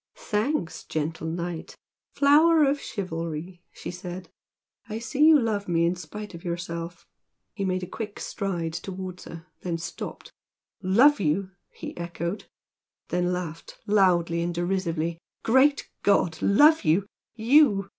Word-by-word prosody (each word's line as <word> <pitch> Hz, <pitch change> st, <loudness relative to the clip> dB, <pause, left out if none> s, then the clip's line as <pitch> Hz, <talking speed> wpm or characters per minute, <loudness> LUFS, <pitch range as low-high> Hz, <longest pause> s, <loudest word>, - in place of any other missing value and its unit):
"Thanks, 215 Hz, -, -2 dB
gentle 160 Hz, +1 st, -3 dB
Knight! 170 Hz, 0 st, -4 dB, 0.4 s
flower 310 Hz, +3 st, +6 dB
of 280 Hz, 0 st, +2 dB
chivalry!" 170 Hz, -2 st, -5 dB
she -, -, -7 dB
said 180 Hz, 0 st, -7 dB, 0.6 s
"I 215 Hz, -, -3 dB
see 235 Hz, +6 st, 0 dB
you 310 Hz, -1 st, +8 dB
love 215 Hz, -4 st, -1 dB
me 170 Hz, -1 st, +2 dB
in 170 Hz, -, +2 dB
spite 205 Hz, +5 st, -8 dB
of 170 Hz, +1 st, -10 dB
yourself!" 170 Hz, -1 st, -5 dB, 0.5 s
He 200 Hz, -3 st, -3 dB
made 185 Hz, -1 st, -1 dB
a -, -, -4 dB
quick 210 Hz, +2 st, -6 dB
stride 175 Hz, -5 st, -3 dB
towards 185 Hz, +1 st, -6 dB
her, 165 Hz, 0 st, -9 dB, 0.2 s
then 170 Hz, -2 st, -2 dB
stopped. 170 Hz, +1 st, -7 dB, 0.5 s
"Love 235 Hz, +11 st, +5 dB
you!" 185 Hz, +2 st, 0 dB, 0.2 s
he -, -, -8 dB
echoed, 170 Hz, +2 st, -4 dB, 0.6 s
then 180 Hz, 0 st, +1 dB
laughed 170 Hz, -3 st, -5 dB
loudly 175 Hz, -5 st, +3 dB
and 170 Hz, 0 st, -2 dB
derisively 170 Hz, -2 st, -1 dB, 0.2 s
"Great 265 Hz, +5 st, +4 dB
God! 175 Hz, -5 st, +2 dB
Love 295 Hz, +10 st, +5 dB
you? 165 Hz, +6 st, +3 dB, 0.3 s
YOU? 230 Hz, -4 st, +4 dB
180 Hz, 135 wpm, -26 LUFS, 170-215 Hz, 0.6 s, you